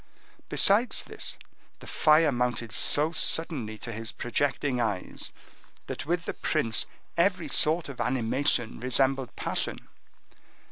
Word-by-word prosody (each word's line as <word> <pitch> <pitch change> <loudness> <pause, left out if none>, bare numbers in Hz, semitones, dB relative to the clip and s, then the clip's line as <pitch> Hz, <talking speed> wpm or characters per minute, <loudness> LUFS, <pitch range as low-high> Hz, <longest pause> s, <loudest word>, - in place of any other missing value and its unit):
Besides 215 +5 +4
this, - - -3 0.4
the - - -14
fire 155 0 +3
mounted 120 -2 -2
so 150 +8 +5
suddenly 145 -10 0
to 115 - -7
his 110 0 -4
projecting 130 0 -1
eyes, 105 -5 -3 0.5
that - - -6
with 170 0 -1
the - - -3
prince 115 -8 0 0.3
every 180 0 +1
sort 160 +2 +3
of 140 -3 -7
animation 125 -1 0
resembled 130 +1 0
passion. - - -3
135 Hz, 120 wpm, -27 LUFS, 120-160 Hz, 0.5 s, so